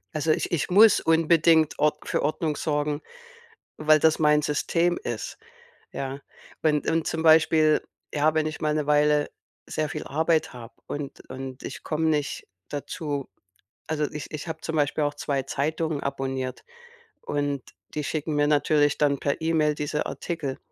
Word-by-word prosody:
Also, 155 +1 +1
ich - - 0
ich 170 - 0
muss 210 +3 +7
unbedingt 160 -1 +3
Ord 150 0 +1
für - - 0
Ordnung 155 +1 -1
sorgen, 150 0 -1 0.8
weil 155 0 +5
das 160 +1 +3
mein 150 0 +4
System 170 +4 +1
ist, 120 -2 -5 0.5
ja? 135 +1 -4 0.4
Wenn 150 -2 +3
und, 165 -1 0
zum 160 - -2
Beispiel, 155 -1 +5 0.3
ja, 155 +1 +2
wenn 155 0 +1
ich 155 - -5
mal 150 -1 +1
'ne 150 -2 -1
Weile 150 0 +3 0.4
sehr 155 -1 -2
viel - - -5
Arbeit 160 +1 +1
habe 115 -1 -11
und 145 -1 -7
und 130 0 -7
ich - - -7
komme 160 +1 -1
nicht 150 -2 -1 0.2
dazu. 145 -1 -4 0.6
Also, 150 -2 -1
ich 150 - -7
ich 155 +2 -6
habe 160 -1 -5
zum 160 - -4
Beispiel 150 0 +1
auch 145 0 0
2 140 -2 -2
Zeitungen 155 +2 -2
abonniert 135 -2 -3 0.6
und 145 -2 -2 0.3
die 150 - -2
schicken 155 +1 -2
mir 145 0 +3
natürlich 145 0 +3
dann 140 -2 +2
per 140 +2 -1
E-Mail 155 -2 +2
diese 150 0 -2
Artikel. 155 -6 -4
150 Hz, 160 wpm, -25 LUFS, 145-160 Hz, 0.8 s, muss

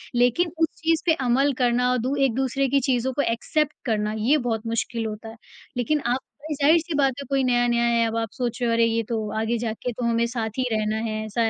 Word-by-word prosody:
लेकिन 245 +8 +2
उस 325 0 +3
चीज़ 325 0 +2
पे 330 - +4
अमल 270 +4 +3
करना 250 0 +2
और 250 - +2
दू 255 +4 -1
एक-दूसरे 265 +2 0
की 275 +2 +3
चीज़ों 260 -1 0
को 285 - 0
एक्सेप्ट 290 +5 0
करना 215 -3 0
ये 245 +8 +3
बहुत 235 -4 -2
मुश्किल 230 0 -2
होता 220 +1 -6
है। 225 - -11 0.4
लेकिन 275 +5 +1
आप 245 +2 +1 0.3
ज़ाहिर-सी 315 +4 +3
बात 275 -2 +3
है 280 - -6
कोई 275 -1 +1
नया 245 -1 +2
नया 235 0 +2
है 235 -1 +3
अब 225 0 -2
आप 225 -1 -1
सोच 245 0 -3
रहे 240 - +1
हो - - +2
अरे 230 0 +4
ये 230 0 +1
तो 220 -2 -2
आगे 225 +2 0
जाके 230 +2 -3
तो 245 - -6
हमें 235 0 +2
साथ 230 -2 -3
ही 255 - +1
रहना 215 0 0
है। 215 0 -3
ऐसा 225 +1 0
240 Hz, 235 wpm, -24 LUFS, 225-270 Hz, 0.4 s, पे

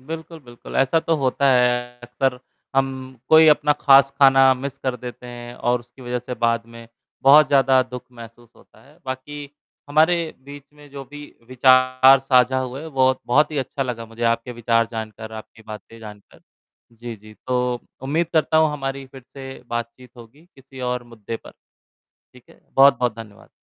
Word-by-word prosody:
बिल्कुल, 160 +4 -8
बिल्कुल, 120 0 -10
ऐसा 135 +5 +2
तो 165 0 0
होता 140 0 0
है। 125 0 +1
अक्सर 125 +1 -2 0.4
हम 135 0 +3 0.4
कोई 160 0 +7
अपना 150 0 +4
ख़ास 135 0 +6
ख़ाना 135 -1 +6
मिस 130 0 -6
कर 130 -1 -3
देते 125 +1 -10
हैं 120 0 -9
और 120 0 -1
उसकी 125 +2 -18
वजह 125 0 -3
से 125 +1 -7
बाद 115 -1 -1
में 115 0 -12 0.4
बहुत 145 +3 +7
ज़्यादा 135 -2 +4
दुख 125 -1 -9
महसूस 115 0 -14
होता - - -22
है। 145 +3 -22
बाकी 140 +2 -7 0.4
हमारे 155 +4 +3 0.3
बीच 140 0 -13
में 145 -1 -17
जो 140 -1 -9
भी 145 +2 -11 0.2
विचार 130 +1 +5
साझा 130 -1 +3
हुए, 130 +5 -6
बहुत 130 -2 +1
बहुत 150 +5 +3
ही 150 - -3
अच्छा 135 +1 -3
लगा 120 -3 -5
मुझे 115 +1 -10
आपके 115 +1 -1
विचार 115 -1 +1
जानकर, 110 0 -7
आपकी 110 0 -11
बातें 110 +1 -11
जानकर। 105 -2 -14 0.5
जी, 115 0 -9
जी 110 +1 -16
तो 125 -1 0 0.3
उम्मीद 155 +5 -1
करता 155 0 +1
हूँ 155 -1 +3
हमारी 135 -1 -5
फिर 135 - -12
से 135 -2 -10
बातचीत 120 +2 -6
होगी 120 +7 -16
किसी 135 0 -14
और 125 0 -2
मुद्दे 115 -1 -8
पर, - - -15 0.8
ठीक 125 -1 -20
है। - - -21
बहुत-बहुत 130 -4 +4
धन्यवाद। 105 -3 -13
130 Hz, 175 wpm, -21 LUFS, 120-140 Hz, 0.8 s, कोई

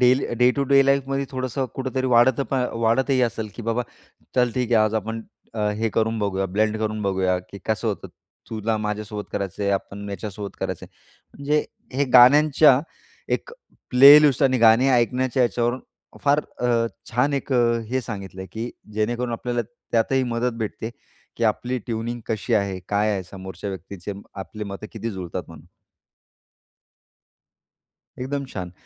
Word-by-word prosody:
Daily 125 +2 +4
day 125 - +6
to 140 - +1
day 135 0 +7
life 140 -1 +3
मध्ये 135 0 -1
थोडंसं 130 +1 -2
कुठेतरी 130 0 -2
वाढत 120 +1 +4
प - - 0 0.3
वाढतही 130 +3 +2
असेल, 110 -2 -1
की 120 - -6
बाबा 115 +2 0 0.5
चल 125 -2 +3
ठीक 125 -2 -1
आहे, 110 -1 +5
आज 110 +1 -1
आपण 110 +1 -3 0.3
अ, 105 -1 0
हे 110 +2 -1
करून 110 0 +1
बघूया 95 -2 -1
ब्लेंड 110 +1 +2
करून 110 0 -2
बघूया, 95 -2 +1
की 95 +2 -11
कसं 110 +1 0
होतं, 105 - -4 0.4
तुला 110 0 -1
माझ्यासोबत 105 0 -4
करायचं 100 0 -3
आहे. 100 - +1
आपण 100 +1 -4
याच्यासोबत 100 +1 -6
करायचं - - -4
आहे. - - -29 0.4
म्हणजे 150 +2 +1 0.3
हे 140 - +3
गाण्यांच्या 140 +2 +7 0.5
एक - - -5 0.4
प्लेलिस्ट 140 +1 +8
आणि 130 -2 +3
गाणे 115 +3 +6
ऐकण्याच्या 125 +1 +2
याच्यावरून 120 +2 0 0.4
फार 145 +1 +4 0.2
अ, 120 -2 +2 0.2
छान 125 +5 +1
एक 135 0 -3
अ, 120 -1 +3
हे 130 - +1
सांगितलं 100 -6 -7
आहे, 95 - -7
की 115 +2 -4 0.2
जेणेकरून 120 +3 -1
आपल्याला 120 +1 -2 0.3
त्यातही 130 +3 +2
मदत 120 0 -1
भेटते, 110 +1 -4 0.5
की 115 - -1
आपली 120 +4 0
ट्यूनिंग 120 +1 -3
कशी 110 -2 -1
आहे? 100 -2 0
काय 105 +1 +1
आहे? 95 -2 -2
समोरच्या 95 +2 -7
व्यक्तीचे 95 +1 -7 0.3
आपली 105 -1 -7
मतं 100 +2 -7
किती 115 +1 -4
जुळतात 90 -4 -5
म्हणू - - -13 2.5
एकदम 140 +2 -3
छान. 90 -2 -5
115 Hz, 160 wpm, -23 LUFS, 105-130 Hz, 2.5 s, प्लेलिस्ट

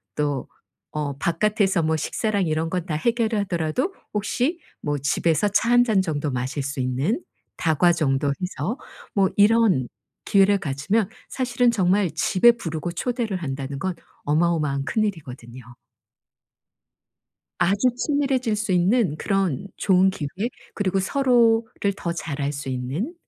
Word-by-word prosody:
또 145 -3 -1 0.5
어 145 -2 -2
바깥에서 195 +3 +1
뭐 160 0 +1
식사랑 205 +5 -1
이런 160 +1 0
건 180 -1 -2
다 170 - -4
해결을 225 +4 +1
하더라도 185 - -1 0.2
혹시 245 - -1 0.2
뭐 145 -1 -1
집에서 160 +7 +1
차 205 +3 +1
1 245 0 +6
잔 220 -5 +2
정도 150 -5 -2
마실 130 +3 -3
수 140 0 -4
있는 135 - 0 0.4
다과 165 +1 +3
정도 145 -3 +1
해서 190 +5 -3 0.4
뭐 195 -2 +3
이런 205 - +4 0.4
기회를 200 -1 +4
가지면 170 +8 0 0.2
사실은 245 -1 +1
정말 190 -3 +2
집에 185 +8 +4
부르고 170 -6 -4
초대를 230 +1 -2
한다는 135 -1 -4
건 190 +4 -1 0.3
어마어마한 150 -3 +1
큰일이거든요. 135 - -3 2.0
아주 200 +7 +3
친밀해질 265 -3 0
수 215 -1 -3
있는 180 - +2
그런 195 -3 -1
좋은 190 0 +4
기회 150 -6 -4 0.5
그리고 195 -2 0
서로를 230 -3 +2
더 170 - -3
잘 155 -4 -5
알 140 +1 -1
수 140 -1 -6
있는 135 - -3
185 Hz, 275 characters per minute, -23 LUFS, 150-220 Hz, 2.0 s, 1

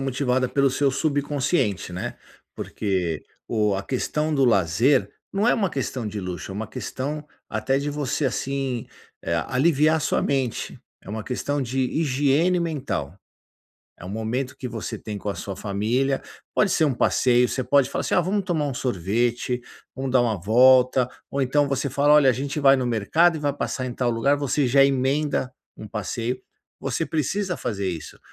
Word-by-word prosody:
motivada 130 -1 0
pelo 140 +1 +2
seu 135 +1 +2
subconsciente, 140 - 0
né, 90 - -4 0.4
porque 90 -7 -2 0.2
o 105 -3 +1
a 95 - -2
questão 150 +7 -1
do 135 - +3
lazer 115 - +3 0.2
não 205 +3 +1
é - - +5
uma 200 -6 0
questão 130 -4 -3
de 105 0 -4
luxo, 90 +1 -5
é - - -8
uma 110 +2 -4
questão 145 +7 -5 0.2
até 115 +5 0
de 145 +1 -2
você 145 0 -2
assim 135 -1 -2 0.4
eh, 85 - -1
aliviar 155 +3 +3
a - - -1
sua - - +1
mente, 135 -4 -1 0.2
é - - -15
uma 110 +1 -4
questão 145 +3 -2
de 130 +2 -2
higiene 145 +5 +2
mental. 135 - -3 0.8
É - - -11
um 90 - -7
momento 110 +5 -3
que - - -6
você 115 -3 -5
tem 105 -2 -6
com 105 - -6
a 100 - -1
sua 100 - -5
família, 115 +8 0 0.3
pode 205 - +3
ser 160 -3 +3
um 140 - 0
passeio, 125 0 +3
você 130 - -2
pode 140 0 +3
falar - - -2
assim: - - -1
"Ah, - - +5
vamos 195 +3 -1
tomar 165 -6 0
um 140 - -2
sorvete, 120 +3 -1 0.3
vamos 135 0 -3
dar 125 -1 +4
uma 110 -6 -1
volta", 125 +4 +5 0.2
ou 140 - 0
então 145 +2 +2
você 135 0 -1
fala: 145 +3 +4
"Olha, 140 -3 +6
a - - +2
gente 140 +4 -3
vai 135 -1 +6
no 130 - -1
mercado 155 +10 +3
e 155 - -5
vai 145 -1 0
passar 130 -2 -3
em 125 - -4
tal 125 -2 0
lugar", 130 +5 +2
você 140 0 +1
já 135 +3 +5
emenda 135 0 +1 0.2
um 110 - -9
passeio. 115 +4 -3 0.4
Você - - -1
precisa 180 +5 -1
fazer 100 -4 -2
isso, 80 -3 -8
130 Hz, 185 wpm, -24 LUFS, 115-145 Hz, 0.8 s, Olha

